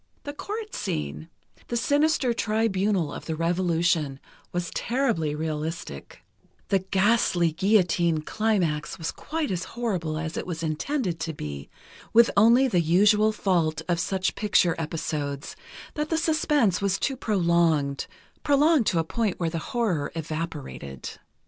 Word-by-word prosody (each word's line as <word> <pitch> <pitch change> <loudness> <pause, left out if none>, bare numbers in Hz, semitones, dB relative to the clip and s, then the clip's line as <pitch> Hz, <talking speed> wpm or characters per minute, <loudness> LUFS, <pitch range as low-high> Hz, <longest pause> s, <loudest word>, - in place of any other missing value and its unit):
The 285 - -5
court 425 +7 -6
scene, 75 +1 -4 0.4
the 240 - -1
sinister 285 0 +2
tribunal 210 -7 0
of - - -8
the 160 - -2
Revolution, 165 -4 +1 0.3
was 175 -1 -3
terribly 230 - 0
realistic; 155 - -5 0.5
the 195 -2 +3
ghastly 190 -3 +2
guillotine 175 -3 +2
climax 180 -8 0
was 165 -2 -3
quite 315 -4 -3
as 180 -1 -2
horrible 180 -10 -1
as 160 0 -4
it - - -4
was 165 -2 -4
intended 175 - -2
to 165 0 -3
be, 70 - -7 0.4
with 235 +1 +6
only 235 +6 +6
the 180 -8 +2
usual 210 +6 +4
fault 165 -7 0
of 175 -2 +1
such 190 +2 0
picture 200 -5 +2
episodes, 150 -3 -3 0.4
that 300 -1 -3
the 325 - +1
suspense 300 - +2
was 195 -1 +1
too 270 - -1
prolonged—prolonged 180 - +1
to 175 - +2
a 165 - +2
point 210 +4 -2
where 165 -2 -1
the 165 - -2
horror 205 -12 0
evaporated. 155 - -5
175 Hz, 135 wpm, -26 LUFS, 160-225 Hz, 0.5 s, with